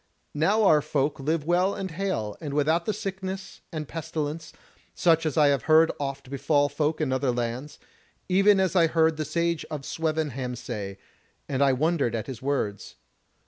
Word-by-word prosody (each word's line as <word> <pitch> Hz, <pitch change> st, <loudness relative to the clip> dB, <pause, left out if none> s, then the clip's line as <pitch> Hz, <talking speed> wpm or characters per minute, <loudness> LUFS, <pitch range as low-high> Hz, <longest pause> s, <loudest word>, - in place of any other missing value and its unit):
Now 195 Hz, +9 st, +2 dB
our 155 Hz, -7 st, +5 dB
folk 140 Hz, 0 st, -1 dB
live 150 Hz, +2 st, -1 dB
well 180 Hz, +4 st, +2 dB
and 190 Hz, -2 st, -4 dB
hale, 160 Hz, -, -2 dB
and 145 Hz, -3 st, -4 dB
without 160 Hz, +4 st, +2 dB
the -, -, +1 dB
sickness 190 Hz, -2 st, -6 dB
and 155 Hz, -3 st, -5 dB
pestilence, 155 Hz, -1 st, -4 dB, 0.4 s
such 165 Hz, -2 st, +3 dB
as 155 Hz, -, -3 dB
I 150 Hz, -2 st, +6 dB
have 140 Hz, -4 st, 0 dB
heard 160 Hz, +1 st, +6 dB
oft 140 Hz, -2 st, -5 dB
befall 145 Hz, +1 st, +2 dB
folk 150 Hz, +2 st, -1 dB
in 145 Hz, -4 st, 0 dB
other 130 Hz, 0 st, 0 dB
lands: 120 Hz, +4 st, -4 dB, 0.5 s
even 195 Hz, +2 st, +4 dB
as 190 Hz, 0 st, +1 dB
I 170 Hz, -2 st, +5 dB
heard 160 Hz, -1 st, +2 dB
the 155 Hz, -, -2 dB
Sage 170 Hz, +2 st, -1 dB
of 145 Hz, -3 st, -5 dB
Swevenham 150 Hz, -6 st, -2 dB
say, 105 Hz, -5 st, -6 dB, 0.5 s
and 135 Hz, -1 st, -1 dB
I 140 Hz, -1 st, +5 dB
wondered 145 Hz, -3 st, +1 dB
at 110 Hz, -, -3 dB
his 130 Hz, -4 st, -7 dB
words. 130 Hz, -8 st, -2 dB
155 Hz, 175 wpm, -26 LUFS, 135-165 Hz, 0.5 s, I